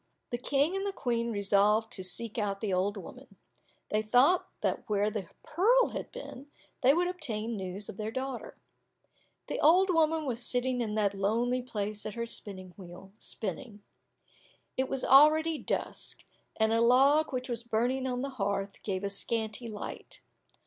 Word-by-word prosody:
The 240 - -2
King 285 +7 +1
and 390 - -1
the 400 - -1
Queen 235 -9 -1
resolved 210 +2 +2
to 190 - -3
seek 220 +5 -2
out 200 -2 -1
the 205 -3 -2
old 195 +3 0
woman. 195 - -11 0.6
They 215 - +2
thought 250 +11 +4
that - - +1
there - - -23
where 210 0 +1
the 200 -5 -5
pearl 460 +10 +3
had - - -6
been, 290 - -9 0.3
they 260 - +6
would 350 +4 +2
obtain 235 -11 -3
news 190 +1 -5
of - - -8
their 215 0 -3
daughter. 260 +1 -5 0.9
The - - -4
old 365 +5 +5
woman 320 -2 +2
was 245 -3 -3
sitting 250 0 0
in 215 -2 -2
that 205 -2 +2
lonely 230 +6 0
place 210 -4 -4
at 215 - -6
her 235 0 -2
spinning 190 -5 -6
wheel, 185 0 -11
spinning. 210 +1 -5 0.9
It 260 0 -1
was 270 - -1
already 310 +3 +6
dusk, - - -3 0.3
and 220 0 +2
a 230 - +3
log 275 +6 +5
which 255 0 -3
was 240 -2 -3
burning 240 +3 0
on 250 0 -2
the 275 - -2
hearth 195 0 -2
gave 190 -2 -3
a 200 - -1
scanty 220 +2 -2
light. 210 -1 -7
235 Hz, 170 wpm, -30 LUFS, 205-270 Hz, 0.9 s, they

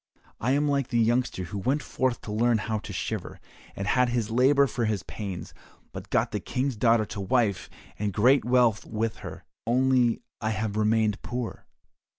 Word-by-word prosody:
I 125 +4 +1
am 145 +1 +2
like 140 -3 +1
the 120 - -1
youngster 120 -3 +1
who 100 +3 -5
went 135 +8 0
forth 130 -2 -1
to 105 - -7
learn 115 +2 +2
how 110 0 -2
to 105 0 -8
shiver, 90 - -4 0.4
and 100 - -4
had 125 +3 +3
his 115 -2 -1
labour 135 +4 +5
for 120 -3 -2
his 105 -4 -1
pains, 100 -4 -6 0.4
but - - -8
got - - +1
the - - -2
King's 130 0 -2
daughter 115 0 +3
to 100 - -6
wife 100 0 +1 0.3
and 105 0 -1
great 125 +8 +4
wealth 120 -3 +3
with 110 0 -3
her, - - -9 0.2
only 125 -1 +2 0.2
I 110 - 0
have 110 -1 -2
remained 110 -1 +2
poor. 125 -1 -5
115 Hz, 180 wpm, -27 LUFS, 105-125 Hz, 0.4 s, labour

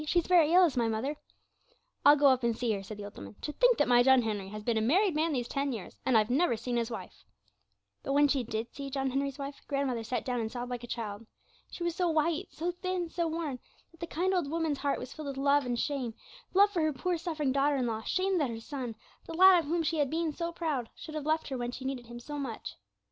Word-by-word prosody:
'She's 340 +2 +1
very 335 -4 +5
ill, 365 +2 +7
is 320 - -1
my 235 -2 +2
mother.' 225 +7 -1 0.9
'I'll 290 +1 +8
go 290 0 +2
up 260 -1 +3
and 235 -2 0
see 240 -2 0
her,' 200 -2 -1
said 205 +2 -8
the 205 - -7
old 205 - -10
woman. 100 +1 -9
'To - - -4
think - - +4
that 290 - +3
my 245 -1 +6
John 260 0 +5
Henry 205 -3 -3
has 210 +1 -7
been 235 +1 0
a - - -1
married 360 - +3
man 315 +2 +1
these 245 -4 -1
ten 280 0 -1
years, 220 -7 -6
and 255 -3 +5
I've 215 +2 +2
never 275 -3 +2
seen 240 +2 -3
his 235 -1 0
wife!' 205 -6 -8 0.8
But 275 - -2
when 290 +1 +5
she 275 -3 +1
did 225 0 -4
see 280 -1 -6
John 270 -1 -1
Henry's 275 0 -1
wife, 280 0 -6
grandmother 275 -5 -1
sat 230 +1 -3
down 250 -1 -1
and 220 -1 -3
sobbed 245 0 -5
like 245 -1 -4
a - - -7
child. 220 -2 -5 0.4
She 345 - -6
was 345 -1 -1
so 360 -2 +1
white, 325 +3 +1
so 345 +3 -2
thin, 360 -1 -3
so 340 -1 0
worn, 315 -5 -3 0.3
that 330 - -21
the 340 - -4
kind 360 +4 0
old 350 -6 0
woman's 320 -3 -1
heart 285 -1 0
was 255 - -7
filled 310 -2 -7
with 275 -1 -5
love 280 0 +3
and 245 - -1
with 235 - 0
shame 260 -6 -2 0.4
love 405 +1 +6
for 355 -5 0
her 310 -1 +1
poor 345 +6 -1
suffering 315 -5 -1
daughter 280 +2 +2
in 260 -2 0
law, 220 -2 -2
shame 375 - 0
that 285 -5 +1
her 225 -1 -5
son, 245 -1 -5 0.3
the 330 - -6
lad 375 +1 +8
of 330 - -3
whom 330 +3 0
she 320 +1 0
had 285 -2 +2
been 320 0 -1
so 335 +2 -3
proud, 300 -9 -2
should 310 - -9
have 305 -1 -4
left 315 0 +1
her 265 -2 -3
when 240 0 -2
she 260 +1 -8
needed 260 -3 -4
him 240 0 -8
so 290 +4 -6
much. 255 -6 -5
275 Hz, 270 wpm, -30 LUFS, 240-325 Hz, 0.9 s, I'll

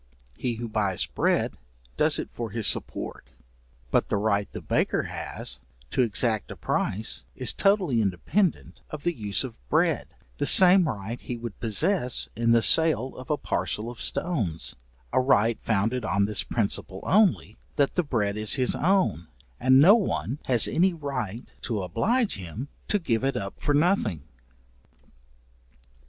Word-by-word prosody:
He 120 - -3
who 120 +1 -6
buys 105 -4 -1
bread, - - 0 0.4
does - - +2
it - - -5
for 115 -2 -5
his 110 +1 -2
support, - - -1 0.6
but - - +2
the 105 - -1
right 100 -1 0
the - - -6
baker - - 0
has - - -4 0.3
to - - +1
exact 110 -2 +1
a - - -7
price 110 +3 -2
is 130 -2 +1
totally 190 - +2
independent 110 - -1
of 155 -2 -8
the 175 - 0
use 105 - 0
of 130 -4 -8
bread; - - 0 0.2
the - - +1
same 185 -3 +7
right 110 +1 -6
he 120 - -6
would 115 -3 -8
possess 125 - +1
in 115 +1 0
the 115 -1 +4
sale 155 -6 +4
of 130 - -11
a 150 - +1
parcel 105 +4 -2
of 120 - -12
stones, 105 - -1 0.4
a - - +3
right 115 -3 +2
founded 115 +3 -1
on 100 -2 +1
this 105 0 +1
principle 100 -3 -2
only, 205 -2 +1 0.2
that 140 -1 +1
the 180 - +1
bread 110 -10 -1
is 110 -1 +2
his 130 -1 +2
own, 180 - +1 0.3
and 130 +1 +5
no 175 +8 +8
one 140 - -1
has 120 -3 +4
any 180 +1 +1
right 125 - -5
to 110 -6 -3
oblige 220 - 0
him 100 - -7 0.2
to 210 - +2
give 130 - -1
it 135 0 0
up 95 0 -6
for 145 - +1
nothing. 145 - +1
120 Hz, 160 wpm, -25 LUFS, 105-150 Hz, 0.6 s, no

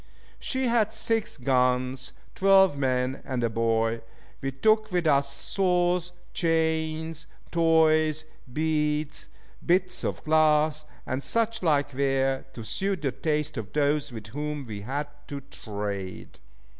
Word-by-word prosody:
She 260 0 -1
had 230 -3 +2
six 225 -4 -1
guns, 125 0 +1 0.2
twelve 190 -4 +5
men, 130 -1 0
and 130 -3 -2
a 115 - +1
boy. 115 0 +1 0.4
We 135 - -2
took 215 +9 +2
with 180 -2 0
us 140 -2 +3
saws, 180 +2 +1 0.2
chains, 160 -1 0 0.2
toys, 155 -2 +3 0.3
beads, 150 +1 -1 0.4
bits 180 +1 +2
of - - -3
glass, 155 -1 +3 0.2
and 130 +1 -2
such 230 +6 0
like 145 -5 +1
ware, 135 0 0
to 115 - -7
suit 190 - -2
the 135 - +1
taste 150 0 -1
of 105 -3 -6
those 145 -1 +1
with 110 -3 -8
whom 150 +2 -4
we 105 -3 -6
had 140 +7 -3 0.2
to 140 - -5
trade. 100 -7 -6
150 Hz, 130 wpm, -27 LUFS, 130-165 Hz, 0.4 s, twelve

